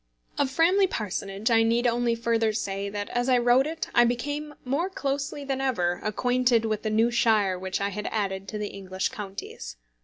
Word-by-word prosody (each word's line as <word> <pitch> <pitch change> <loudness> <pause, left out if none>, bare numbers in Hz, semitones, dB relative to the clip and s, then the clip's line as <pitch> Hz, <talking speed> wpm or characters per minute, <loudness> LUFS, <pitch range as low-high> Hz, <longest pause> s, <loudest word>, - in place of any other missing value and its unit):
Of 280 - +2
Framley 355 +7 +4
Parsonage 200 - -3
I 225 0 +5
need 230 +2 +2
only 240 0 +2
further 230 -1 +1
say, 200 -2 -3
that 205 0 -4
as 245 +1 0
I 255 - +5
wrote 245 +3 +4
it 320 +1 -4
I 240 - +6
became 290 +5 -2
more 290 +9 0
closely 280 -4 -3
than 270 -1 -2
ever 180 -10 0
acquainted 245 +2 +2
with 215 -1 -1
the 215 - -2
new 225 +2 +3
shire 215 -6 +2
which 190 0 -3
I 200 - 0
had 210 +1 -5
added 195 -3 -2
to 210 - -5
the 210 -1 -3
English 190 -1 -3
counties. 190 - -7
230 Hz, 190 wpm, -26 LUFS, 200-260 Hz, -, I